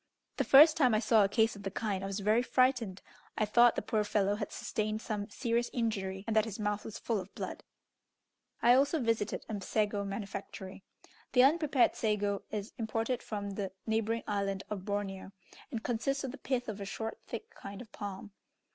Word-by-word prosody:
The - - +2
first 305 +3 +8
time 255 -7 +4
I - - +3
saw 225 -2 +4
a 195 - +2
case 220 +1 +2
of 200 - -10
the 195 - -3
kind 195 -1 -2
I - - -2
was 195 +1 -3
very 215 +4 +3
frightened: 250 -6 +1 0.3
I 215 - +2
thought 235 +3 +5
the - - -2
poor 215 -1 +1
fellow 205 -1 +1
had 205 -1 -4
sustained 215 0 -2
some 215 -2 -4
serious 235 +2 0
injury, 195 -5 -2
and 225 - -2
that 220 0 +4
his 215 -3 -6
mouth 210 0 -1
was 220 - -7
full 225 -3 -1
of 185 +1 -10
blood. - - -5 1.0
I 240 - +7
also 285 +5 +3
visited 230 -4 -1
a 210 -3 -4
sago 205 0 0
manufactory. 195 -1 -6 0.5
The 250 -1 +7
unprepared 290 -2 +4
sago 205 -2 0
is 210 0 -5
imported 225 +2 -1
from 205 -2 -4
the 195 -1 -4
neighbouring 225 +1 0
island 195 -1 -1
of 195 -3 -4
Borromeo, 200 -1 -3 0.4
and 225 -1 -4
consists 270 +4 -1
of 265 - -3
the 275 - -10
pith 255 -2 -1
of 210 -2 -5
a - - -4
short, 220 +3 -5
thick 440 +1 -6
kind 200 - -9
of 235 -3 -11
palm. 205 0 -7
215 Hz, 195 wpm, -32 LUFS, 200-235 Hz, 1.0 s, first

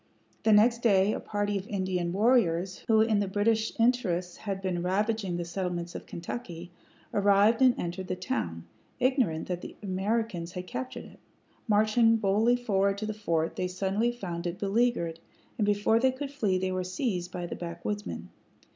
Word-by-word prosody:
The 220 - +3
next 230 +3 +5
day 200 -2 +4
a - - -3
party 205 -1 -1
of 190 - -10
Indian 185 -3 -1
warriors, 190 -4 +2
who 220 -1 +5
in 220 -2 +3
the 200 - 0
British 220 +4 0
interest 190 -8 +1
had 195 -3 -4
been 185 -3 -2
ravaging 195 0 0
the 175 - -3
settlements 175 -1 -3
of - - -8
Kentucky, 175 -1 -7 0.4
arrived 205 +4 +4
and 255 -2 +5
entered 175 +2 -4
the 185 - -2
town, 85 - -3 0.3
ignorant 250 - +1
that 180 -1 -3
the - - -9
Americans 190 -2 -2
had 180 -1 -5
captured 255 +5 -6
it. - - -15 0.5
Marching 220 +2 +4
boldly 215 +3 +3
forward 200 -5 +1
to 215 - -3
the 215 - -3
fort, 165 -6 -1
they 185 - 0
suddenly 195 +5 0
found 175 -7 -5
it 175 +1 -4
beleaguered, 200 -5 0 0.4
and 205 - +2
before 210 +2 +3
they 260 +2 +3
could 275 +2 -6
flee 210 -10 0
they 185 0 -1
were 185 0 -1
seized 185 -1 -2
by 175 -1 -4
the - - -5
backwoodsmen. 175 +5 -5
200 Hz, 175 wpm, -29 LUFS, 180-225 Hz, 0.5 s, next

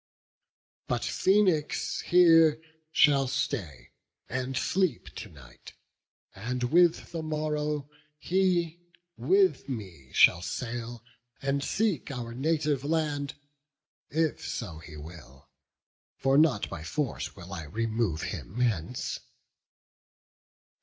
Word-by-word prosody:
But - - -1
Phoenix 185 -6 +2
here 165 -3 +6 0.3
shall 140 -3 +5
stay, 115 - -3 0.4
and 130 +1 -3
sleep 180 -2 0
to - - -7
night; 65 -5 -14 0.6
And 125 +5 -4
with 170 +6 +3
the 165 -2 -3
morrow 150 -2 -2 0.3
he 175 -1 +1 0.4
with 385 - +2
me 95 - -7
shall 85 - +6
sail 120 +3 -5 0.4
And 140 +1 -1
seek 200 - 0
our 120 -4 -5
native 145 0 0
land, 145 -2 -1 0.7
if 160 0 0
so 90 -9 -5
he 80 -1 -11
will: 75 -3 -12 0.6
For 135 0 +2
not 150 -8 +4
by 80 - -7
force 140 - -3
will 90 0 -10
I 80 -5 -5
remove 110 -2 -1
him 105 +8 -5
hence." 115 -2 -1
135 Hz, 105 wpm, -28 LUFS, 105-155 Hz, 0.7 s, here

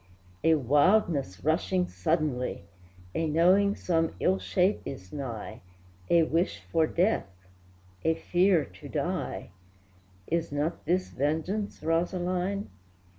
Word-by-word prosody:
A 160 0 +5
wildness 145 - +2
rushing 180 +3 +1
suddenly, 155 - -1 0.5
A 160 - 0
knowing 185 +6 +4
some 165 -2 0
ill 190 +1 +2
shape 185 +3 +1
is 95 -9 -8
nigh, 125 -7 -6 0.5
A 170 -1 +5
wish 165 +3 0
for 160 -1 +3
death, 185 - +1 0.8
a 160 0 +2
fear 180 -1 +2
to - - -12
die, - - -3 0.7
Is 165 +3 -1
not 150 +4 -2
this 180 +3 0
vengeance, 160 +9 -2
Rosaline? 180 - -1
165 Hz, 110 wpm, -28 LUFS, 150-185 Hz, 0.8 s, A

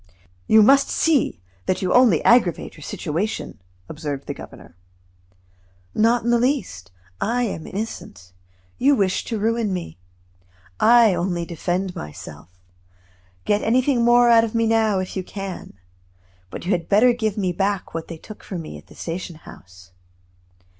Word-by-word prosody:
"You 220 0 +6
must 275 +5 +5
see 270 - +1 0.2
that 185 - 0
you 180 - +1
only 245 -10 +5
aggravate 230 -9 +3
your - - -14
situation," 165 - -4 0.3
observed 140 - -5
the - - -4
governor. 85 - -13 1.2
"Not 230 +1 +2
in 240 - +1
the 240 - +3
least. 230 - -2 0.3
I 245 +3 0
am 195 -8 -4
innocent; 185 - -7 0.5
you 275 +3 +4
wish 195 -5 0
to 225 - -3
ruin 225 0 0
me. 175 - -5 0.8
I 230 -2 +6
only 175 -1 -2
defend 180 +2 -3
myself. 75 +1 -9 1.0
Get 205 0 +1
anything 250 +1 +2
more 240 +1 +5
out 230 -1 +6
of 230 0 -4
me 230 0 +2
now, 220 -2 +2
if 185 -1 -4
you 190 - -1
can. 195 -1 -7 0.8
But - - -8
you 185 - -1
had 175 -3 -1
better 230 +5 +5
give 220 -4 -2
me 190 -3 0
back 195 +2 -2
what 165 -1 -5
they 165 - -8
took 215 +6 -12
from 175 -4 -6
me - - -9
at - - -20
the - - -16
station 170 0 -6
house. 90 - -15
200 Hz, 155 wpm, -22 LUFS, 170-230 Hz, 1.2 s, You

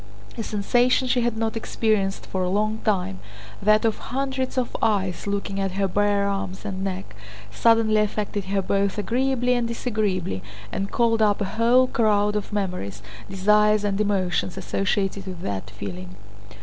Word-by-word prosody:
A 230 - -4
sensation 245 +5 +2
she 250 0 +2
had 235 -1 0
not 225 0 -1
experienced 215 -3 0
for 190 - -3
a 180 - 0
long 215 +3 0
time—that 190 - 0
of 225 - +1
hundreds 265 0 -3
of 250 -2 -1
eyes 195 -4 0
looking 200 -1 -2
at 195 -1 -1
her 195 0 +1
bare 200 +1 +2
arms 195 0 -3
and 190 -2 -4
neck—suddenly 185 - 0
affected 205 -1 -2
her 195 0 0
both 200 +1 0
agreeably 250 +3 +1
and 240 -1 0
disagreeably 210 - -1 0.3
and 195 0 -2
called 230 -2 +2
up 210 -2 +3
a 205 - 0
whole 235 +6 +4
crowd 210 -4 +2
of 210 0 -3
memories, 180 - -3 0.3
desires 210 +2 +3
and 205 0 0
emotions 185 -3 0
associated 195 0 -1
with 180 -2 -6
that 95 - -4
feeling. 90 -2 -7
205 Hz, 150 wpm, -24 LUFS, 190-220 Hz, 0.3 s, whole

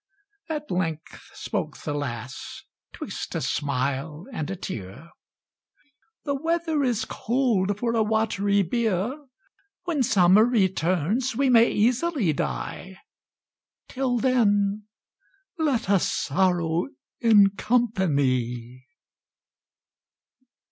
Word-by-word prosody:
At 300 -2 -4
length 165 -4 -4
spoke - - -4
the 145 - -4
lass, 130 -4 -6 0.3
'twixt - - -6
a - - -1
smile 140 +3 -2
and 155 -7 -4
a 195 - -3
tear, 135 - -8 1.1
"The 285 - 0
weather 325 +1 0
is 235 -4 0
cold 220 -6 0
for 235 +1 -1
a 225 - +2
watery 210 -2 +1
bier; 220 - -1 0.7
When 340 -6 -1
summer 195 -2 +5
returns 195 - +1
we 270 +1 +2
may 230 -1 +6
easily 245 - +1
die, 70 - -4 0.9
Till 255 -2 -1
then 210 -5 +2 0.7
let 280 -7 0
us 195 -2 +2
sorrow 175 +1 0 0.3
in 210 -4 +6
company." 135 - 0
200 Hz, 95 wpm, -25 LUFS, 160-240 Hz, 1.1 s, may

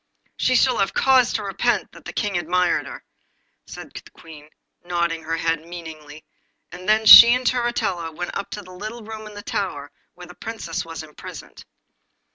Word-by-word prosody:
'She 255 - +1
shall 255 0 +3
have 195 - 0
cause 260 -2 +4
to 215 - -2
repent 195 -1 -1
that - - -16
the - - -6
King 205 -3 -2
admires 175 +1 0
her,' - - -10 0.6
said - - -10
the - - -11
Queen, 150 -2 -15 0.3
nodding 170 -2 -2
her 165 +1 -3
head 165 -1 -1
meaningly, 160 -3 -11 0.5
and 180 +2 -7
then 220 +1 +3
she 235 +3 +11
and 250 0 -4
Turritella 230 -9 -1
went 175 +3 -6
up 200 - -4
to 210 - -7
the 185 - -14
little 215 +5 -8
room 220 0 -9
in 210 - -12
the 205 - -9
tower 145 -11 -4 0.2
where 180 - -11
the 180 - -13
Princess 220 -6 -6
was 165 -1 -8
imprisoned. 150 -1 -12
180 Hz, 180 wpm, -22 LUFS, 165-220 Hz, 0.6 s, she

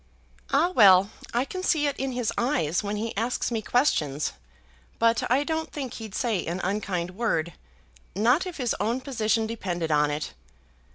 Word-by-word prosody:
"Ah, 310 +6 +3
well; 195 - +6 0.2
I 240 +3 +1
can 370 +5 -5
see 315 -5 +2
it 285 0 0
in 270 -1 -2
his 245 -3 -1
eyes 180 - +1
when 205 0 -3
he 225 +2 -3
asks 235 +4 -1
me 225 -2 -1
questions; 155 - +1 0.6
but 230 0 +2
I 260 +4 +3
don't 320 +1 -3
think 270 -5 -5
he'd 220 -3 -8
say 225 -8 0
an 170 +2 -3
unkind 185 -3 -2
word, 185 -5 -1 0.6
not 245 - +3
if 360 - -7
his 250 -4 0
own 230 +5 0
position 225 -4 0
depended 180 -7 -3
on 150 0 +3
it. 150 - -4
225 Hz, 170 wpm, -26 LUFS, 185-260 Hz, 0.6 s, well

